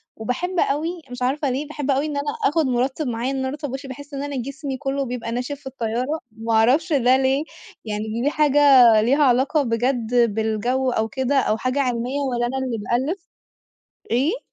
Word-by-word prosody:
وباحب 340 - -2
أوي 305 +4 +1 0.2
مش 250 0 -7
عارفة 275 +2 0
ليه، 280 +4 -2
باحب 290 -2 -2
أوي 275 +3 +1
إن 295 -2 -3
أنا 285 +1 -1
آخُد 320 -2 +2
مُرطِّب 260 +3 -1
معايا 240 +3 -2
إن 270 - -2
أنا 265 0 -1
أرطّب 290 -1 -5
وشي، 270 +1 -6
باحس 285 +2 -10
إن 275 +1 -3
أنا 285 -1 -4
جسمي 275 +1 -5
كله 275 0 -2
بيبقى 240 -2 -4
ناشف 250 +4 -3
في 265 - -11
الطيارة، 255 +4 -2
ما 225 +1 -3
أعرفش 275 +10 +3
ده 255 -1 +4
ليه 270 +2 +1 0.4
يعني 215 +2 -3
دي 290 - +3
حاجة 295 -1 +2 0.4
ليها 275 +6 +3
علاقة 265 +4 +3
بجد 240 0 -1 0.2
بالجو 235 +4 0
أو 220 -1 0
كده 265 +4 -1
أو 220 -3 +1
حاجة 255 +4 -1
علمية 250 +2 -1
والّا 240 0 0
أنا 265 +2 -2
اللي 235 -3 -2 0.3
بألّف، 370 -1 -7 0.8
إيه؟ 295 - +1
265 Hz, 190 wpm, -22 LUFS, 240-285 Hz, 0.8 s, ده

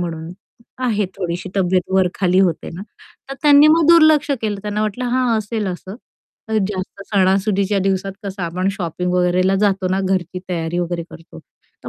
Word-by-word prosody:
म्हणून 165 -1 -5 0.5
आहे 210 -5 0
थोडीशी 180 0 -4
तब्येत 185 -1 +1
वर-खाली 185 0 +2
होते 175 -5 0
ना." 185 - -7 0.5
तर - - -4
त्यांनी 290 0 +7
मग 320 0 +4
दुर्लक्ष 310 -3 +5
केलं 205 -2 -2
त्यांना 210 0 -2
वाटलं 215 +4 -3
हां 245 -3 +2
असेल 215 0 -3
असं 185 +1 -7 0.5
तर 220 - +1
जास्त 195 0 -6
सणासुदीच्या 195 0 +1
दिवसात 195 0 -1
कसं 195 -1 -5
आपण 180 +3 -1
शॉपिंग 180 -2 -3
वगैरेला 180 +1 +2
जातो 195 -2 +1
ना, 190 +1 +1
घरची 185 -1 -1
तयारी 170 -1 -2
वगैरे 175 -1 -2
करतो, 165 - -13 0.5
तर - - -5
190 Hz, 160 wpm, -19 LUFS, 180-210 Hz, 0.5 s, त्यांनी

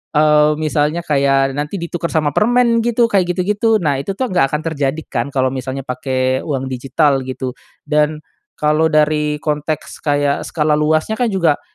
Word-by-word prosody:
eee, 150 0 +4
misalnya 155 +2 -1
kayak 135 -2 +2
nanti 150 +7 -3
ditukar 170 0 -4
sama 150 -2 0
permen 235 +1 +3
gitu, 235 0 +2
kayak 195 -5 +1
gitu-gitu, 210 +4 +1
nah 145 -7 0
itu 195 +5 -4
tuh 260 - 0
nggak 155 - +1
akan 150 +1 -2
terjadi 155 -1 -1
kan 120 +1 -3
kalau 130 -1 0
misalnya 130 +1 -5
pakai 130 0 -1
uang 135 -3 -3
digital 135 +2 0
gitu, 130 -1 -5 0.3
dan 150 0 0 0.3
kalau 155 +1 +2
dari 150 0 +1
konteks 150 0 -3
kayak 145 -1 0
skala 150 -1 0
luasnya 155 +6 +1
kan 240 -2 +2
juga, 170 -7 +1
150 Hz, 165 wpm, -17 LUFS, 135-170 Hz, 0.3 s, eee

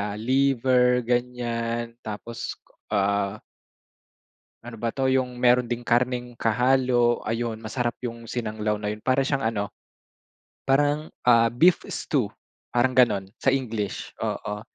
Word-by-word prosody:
liver, 125 0 +3
ganyan 120 -1 -2
tapos, 115 +1 -6 0.3
ah 100 0 0 1.2
ano 120 0 -9
ba 115 +1 -2
'to, 135 +1 -1
yung 130 -1 0
meron 125 0 +3
ding 120 0 -3
karne'ng 125 0 +1
kahalo. 120 +1 +2
Ayun, 115 0 -3
masarap 120 +2 -2
yung 115 -1 -6
sinanglaw 110 -2 -2
na 105 0 -3
yun. 105 - -5
Para 130 +4 +1
siyang 135 -2 -1
ano, 105 -3 -1 1.0
parang, 145 +3 +2 0.2
ah, 115 -1 +6
beef 160 +10 +4
stew, - - -1 0.4
parang 120 +2 +2
ganun 115 -6 +4 0.2
sa - - 0
English, 115 -6 -1
oo. 105 0 -3
120 Hz, 120 wpm, -25 LUFS, 115-125 Hz, 1.2 s, ah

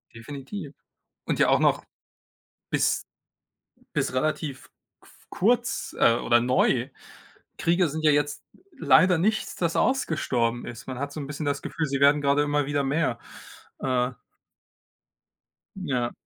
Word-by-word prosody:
Definitiv. 140 - -8 0.5
Und - - -1
ja - - +4
auch - - +4
noch - - +2 0.9
bis - - +1 0.9
bis - - -1
relativ 140 0 -2 0.3
qu - - -22 0.2
kurz, 245 +6 0
äh, 115 - +5
oder 120 0 +3
neu. 125 0 +2 0.7
Kriege 175 +1 +2
sind 155 +2 -5
ja 150 - +6
jetzt 145 0 0 0.3
leider 175 - +4
nichts, 215 +5 0
das 170 -2 -1
ausgestorben 125 - 0
ist. 120 - -9
Man 130 -1 -6
hat 140 +1 -4
so 155 - -6
'n 140 - -5
bisschen 145 +1 -5
das 140 0 -1
Gefühl, 160 -2 -3
sie 140 0 -2
werden 145 +1 +5
grade 140 +1 +3
immer 145 -1 0
wieder 145 0 0
mehr. 140 -3 0 0.6
Äh 125 -1 0 1.6
Ja. 130 -10 -2
145 Hz, 135 wpm, -26 LUFS, 130-165 Hz, 1.6 s, ja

